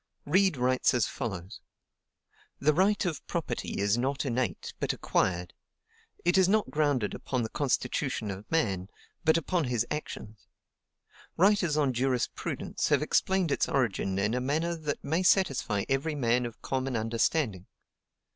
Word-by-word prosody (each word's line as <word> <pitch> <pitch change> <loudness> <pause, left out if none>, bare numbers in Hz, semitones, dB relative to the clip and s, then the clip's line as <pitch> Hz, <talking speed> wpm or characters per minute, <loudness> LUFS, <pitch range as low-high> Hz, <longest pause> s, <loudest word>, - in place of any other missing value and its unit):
Reid 185 +1 +3
writes 125 0 +2
as 120 - +3
follows: 100 -5 -5 1.0
"The 150 +2 +3
right 195 +5 +2
of 160 -6 -2
property 160 -9 -3
is 100 +3 +2
not 135 +3 -1
innate, 125 -7 -2
but - - 0
acquired. 90 -1 0 0.7
It 175 +2 +4
is 185 -1 +4
not 215 +1 +2
grounded 145 -8 +1
upon 130 -3 -2
the 110 - -4
constitution 130 -5 -1
of 100 +2 -9
man, 100 - 0 0.3
but 160 0 +4
upon 165 0 0
his 120 -2 0
actions. 110 -8 -6 0.9
Writers 185 -4 +3
on 140 -4 +2
jurisprudence 125 0 -1
have - - +3
explained 190 -4 +1
its - - +1
origin 100 -7 0
in 105 +3 +1
a 125 - 0
manner 160 +6 0
that 150 -3 -4
may 160 +5 0
satisfy 140 - +2
every 140 +4 0
man 120 -2 +1
of 115 - -13
common 130 -1 -2
understanding. 115 - 0
135 Hz, 145 wpm, -29 LUFS, 115-160 Hz, 1.0 s, It